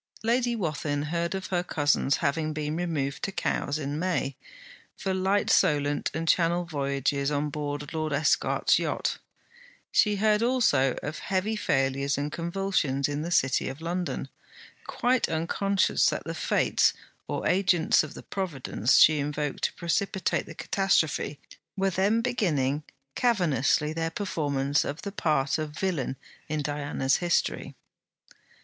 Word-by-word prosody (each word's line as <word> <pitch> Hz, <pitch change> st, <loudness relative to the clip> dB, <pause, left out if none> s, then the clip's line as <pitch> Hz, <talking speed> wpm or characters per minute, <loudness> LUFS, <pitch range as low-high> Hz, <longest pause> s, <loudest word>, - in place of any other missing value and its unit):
Lady 240 Hz, +1 st, +1 dB
Wathin 150 Hz, -6 st, -2 dB
heard 170 Hz, +2 st, -1 dB
of 190 Hz, -1 st, -4 dB
her 175 Hz, -, +2 dB
cousin's 145 Hz, -4 st, +1 dB
having 155 Hz, +2 st, 0 dB
been 150 Hz, 0 st, -3 dB
removed 155 Hz, -5 st, -2 dB
to 195 Hz, -, -2 dB
Cowes 145 Hz, -6 st, -1 dB
in 145 Hz, 0 st, -3 dB
May, 170 Hz, -6 st, -1 dB, 0.6 s
for 190 Hz, -, -2 dB
light 190 Hz, +2 st, +1 dB
Solent 145 Hz, -1 st, +2 dB
and 165 Hz, +1 st, -3 dB
Channel 170 Hz, +1 st, +2 dB
voyages 140 Hz, -2 st, -1 dB
on 145 Hz, 0 st, -1 dB
board 145 Hz, 0 st, -4 dB
Lord 155 Hz, -1 st, -2 dB
Esquart's 145 Hz, +1 st, +2 dB
yacht. -, -, -2 dB, 0.7 s
She 210 Hz, -1 st, +3 dB
heard 210 Hz, +1 st, +2 dB
also 235 Hz, -, +2 dB
of 150 Hz, +2 st, -4 dB
heavy 195 Hz, +3 st, -1 dB
failures 135 Hz, -6 st, 0 dB
and 145 Hz, +1 st, -2 dB
convulsions 170 Hz, -5 st, -1 dB
in 145 Hz, 0 st, -3 dB
the 165 Hz, -, -3 dB
City 135 Hz, -7 st, +2 dB
of 135 Hz, -, -8 dB
London, 175 Hz, +2 st, -3 dB, 0.6 s
quite 250 Hz, 0 st, +1 dB
unconscious 190 Hz, +5 st, +1 dB
that -, -, -3 dB
the -, -, -5 dB
Fates, -, -, +2 dB, 0.3 s
or -, -, -2 dB
agents 180 Hz, -3 st, +3 dB
of 155 Hz, -, -7 dB
the -, -, -9 dB
Providence 145 Hz, -, 0 dB
she 155 Hz, -1 st, +6 dB
invoked 145 Hz, 0 st, -2 dB
to -, -, -1 dB
precipitate 185 Hz, +2 st, -1 dB
the -, -, -9 dB
catastrophe, 160 Hz, -7 st, 0 dB, 0.4 s
were 195 Hz, 0 st, +1 dB
then 200 Hz, +5 st, +2 dB
beginning 155 Hz, -, 0 dB, 0.3 s
cavernously 155 Hz, -, +1 dB
their 165 Hz, 0 st, -1 dB
performance 145 Hz, -7 st, 0 dB
of 145 Hz, +2 st, -5 dB
the 200 Hz, -, -4 dB
part 150 Hz, -7 st, 0 dB
of 150 Hz, -1 st, -5 dB
villain 155 Hz, -9 st, -1 dB, 0.3 s
in 155 Hz, -1 st, -1 dB
Diana's 145 Hz, -2 st, 0 dB
history. 175 Hz, -1 st, -1 dB
155 Hz, 140 wpm, -27 LUFS, 145-190 Hz, 0.7 s, she